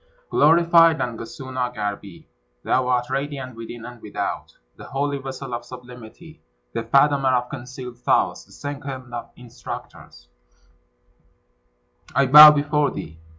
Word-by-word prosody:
Glorified 165 +1 +5
Nangasuna 125 +1 -5
Garbi! 100 -3 -6 0.4
thou 130 0 +1
art 125 0 0
radiant 135 -2 -4
within 115 0 -9
and 120 -2 -11
without; 105 - -5 0.2
the - - -12
holy 140 +1 -2
vessel 135 -1 -7
of 120 0 -4
sublimity, 125 +5 -13 0.3
the - - -2
fathomer 135 +3 +3
of 125 0 -2
concealed 125 0 -9
thoughts, - - 0
the - - -24
second 135 -3 -7
of 120 - -6
instructors, 120 0 -11 1.9
I 140 - +4
bow 150 +3 +11
before 150 0 +1
thee. 80 +1 -8
130 Hz, 120 wpm, -22 LUFS, 120-145 Hz, 1.9 s, bow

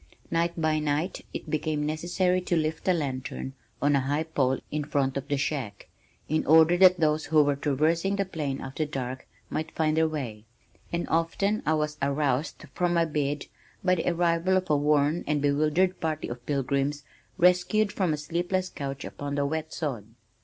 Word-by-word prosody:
Night 170 0 0
by 155 -1 +2
night 150 +4 -1
it - - -6
became 155 -1 -1
necessary 180 +4 0
to 175 - 0
lift 155 +2 -2
a - - +6
lantern 135 -4 -3 0.3
on 145 0 +4
a - - +4
high 145 +4 0
pole 135 -5 +1
in 150 0 -1
front 140 -2 0
of 140 0 -4
the 145 -1 0
shack, 135 -7 -3 0.4
in 155 +1 +1
order 160 +2 +7
that 185 0 +6
those 155 -1 +2
who 155 -2 +4
were 145 0 +1
traversing 160 +7 +1
the 200 0 0
plain 150 -7 -3
after 135 +4 -3
dark 130 -3 -5 0.2
might 155 0 -2
find 155 -1 0
their 160 0 +3
way, 125 -9 -5 0.5
and 170 0 -2
often 180 +6 +1
I 155 - +4
was 150 0 -2
aroused 140 +1 0
from 175 -1 +1
my 170 0 +3
bed 145 -2 -2 0.4
by 185 -1 +4
the 175 -1 +1
arrival 170 +1 +2
of 185 -4 -1
a - - +5
worn 150 +2 +2
and 150 -1 +1
bewildered 150 +6 +2
party 155 -1 -2
of 120 0 -8
pilgrims 140 +1 0 0.3
rescued 180 +4 +3
from 185 -5 0
a 150 - 0
sleepless 175 +5 -1
couch 140 -3 -5
upon 145 0 -5
the 145 0 +1
wet 160 +2 -3
sod. 135 -11 -3
155 Hz, 180 wpm, -27 LUFS, 140-170 Hz, 0.5 s, order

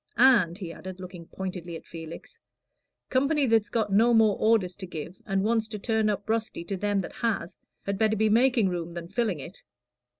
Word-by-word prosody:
And," 220 -9 +5
he 175 -5 -6
added, 185 +1 -9
looking 180 -2 -9
pointedly 180 -3 -6
at - - -9
Felix, 165 0 -10 0.7
"company 280 +3 +2
that's 225 -3 +2
got 215 -3 0
no 230 +4 +5
more 220 -3 +5
orders 215 -5 +2
to 190 -2 -7
give, 170 +2 -7
and 195 -1 +1
wants 225 0 +1
to 220 -1 -6
turn 220 0 +1
up 205 0 -2
rusty 220 -5 -1
to 195 +3 -4
them 205 +1 0
that - - -7
has, 220 -7 -1 0.3
had 200 0 -2
better 220 -1 +3
be 220 +1 +3
making 235 0 +4
room 170 -1 -4
than 170 -1 -6
filling 200 -3 -1
it. - - -10
205 Hz, 195 wpm, -27 LUFS, 180-225 Hz, 0.7 s, And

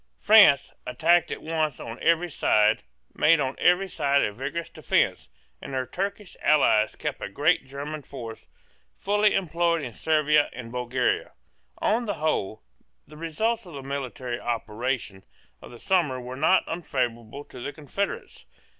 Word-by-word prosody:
France, - - +6
attacked 170 +7 +3
at - - -6
once 155 -3 -1
on 115 +2 -8
every 170 +1 +3
side, 105 -5 +3 0.3
made 165 +1 +4
on 130 -2 -1
every 180 +2 +3
side 140 -5 +1
a 105 - -1
vigorous 135 +8 -5
defence; - - 0 0.3
and 135 - -6
her 130 -1 -1
Turkish 195 - -5
allies 110 -8 +3
kept - - -4
a - - -4
great 145 - +1
German 145 +3 -6
force 120 -5 -9 0.5
fully 205 +1 +2
employed 170 -3 0
in 120 -4 -6
Servia 150 +2 +2
and 120 -2 -8
Bulgaria. 125 0 -1 0.4
On 235 +3 +1
the 205 -3 -2
whole, 150 -10 -2 0.4
the 150 - -15
results 180 +8 -2
of 175 - -11
the 140 -1 -7
military 130 -3 -4
operations 115 -3 -3 0.4
of - - -11
the 120 - -11
summer 155 -5 +1
were 125 +1 -7
not 160 +7 +3
unfavourable 130 -5 -3
to 125 - -12
the 135 - -5
confederates. 155 +8 -5
145 Hz, 150 wpm, -26 LUFS, 125-170 Hz, 0.5 s, France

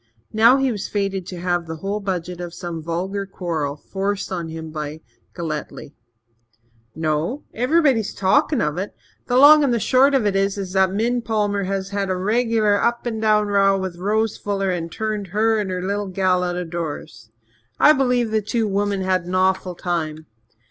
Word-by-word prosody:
Now 230 +4 +6
he 270 -1 +1
was 210 -3 -4
fated 195 -3 -2
to 180 - -6
have 175 -1 -1
the 160 - -5
whole 195 +6 -3
budget 180 -3 -4
of 175 -1 -7
some 170 -3 -5
vulgar 185 +5 -3
quarrel 160 -7 -3
forced 195 +6 -3
on 170 -3 -3
him 160 0 -7
by 155 0 -5 0.3
Galletly. 155 -4 -5 1.0
"No? 160 - -1
Everyone's 255 -3 +2
talkin' 275 +7 +2
of 150 +3 -1
it. 195 - -5 0.3
The 245 - +2
long 295 +3 +8
and 245 -4 +2
short 265 +6 +4
of 255 -5 +2
it 200 -1 +1
is 195 +1 +1 0.2
that 190 -1 +3
Min 235 +5 0
Palmer 205 -3 -1
has 195 0 -3
had 200 -1 -2
a 185 - 0
regular 215 0 +2
up 235 0 0
and 225 -2 -3
down 215 -1 +3
row 195 -1 +3
with 190 -2 -4
Rose 215 +4 0
Fuller 195 -2 -1
and 170 -2 -3
turned 215 -1 -3
her 220 +4 +1
and 205 -2 -2
her 180 -1 -3
little 200 +1 -2
gal 185 -1 +1
out 180 -1 -1
of 175 -2 -5
doors. 155 -8 -6 0.5
I 305 - +7
believe 250 -5 +1
the 220 0 +1
two 220 +2 -1
women 200 0 0
had 185 -1 0
an 180 +1 -3
awful 185 -1 +1
time. 160 -3 -3
195 Hz, 185 wpm, -21 LUFS, 175-220 Hz, 1.0 s, long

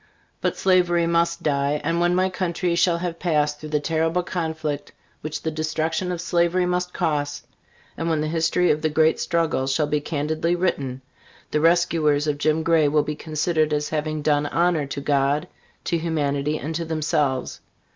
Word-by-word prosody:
But - - -1
slavery 175 -2 +3
must 170 0 +1
die; 140 0 +1
and 165 +2 0
when 175 +1 +2
my 185 +1 +3
country 180 -1 -1
shall 170 0 +3
have 170 -1 -4
passed 150 -4 +1
through 155 - -8
the 150 0 +1
terrible 165 +3 0
conflict 160 -4 -3 0.3
which 155 0 -5
the 160 - -1
destruction 155 +3 -2
of 175 - -3
slavery 175 +1 +1
must 180 0 -1
cost, 145 -5 -2 0.5
and 165 - -2
when 160 -2 +1
the 155 - -1
history 165 +2 +2
of 150 - 0
the 155 - +1
great 160 +1 +3
struggle 165 -6 0
shall 135 +3 +1
be 150 0 -1
candidly 155 +3 -1
written, 140 -8 -2 0.5
the 150 - +1
rescuers 165 -3 +3
of 145 -1 -1
Jim 155 +2 +1
Gray 165 -2 +3
will 150 +1 +2
be 150 - -3
considered 155 0 0
as 150 0 -1
having 155 0 -2
done 145 -1 +2
honor 165 -1 +1
to 140 0 -5
God, 140 +3 +1 0.4
to 170 - 0
humanity, 150 -2 -1
and 155 +2 -5
to 165 +1 -2
themselves. 150 -5 -1
155 Hz, 175 wpm, -23 LUFS, 150-170 Hz, 0.5 s, slavery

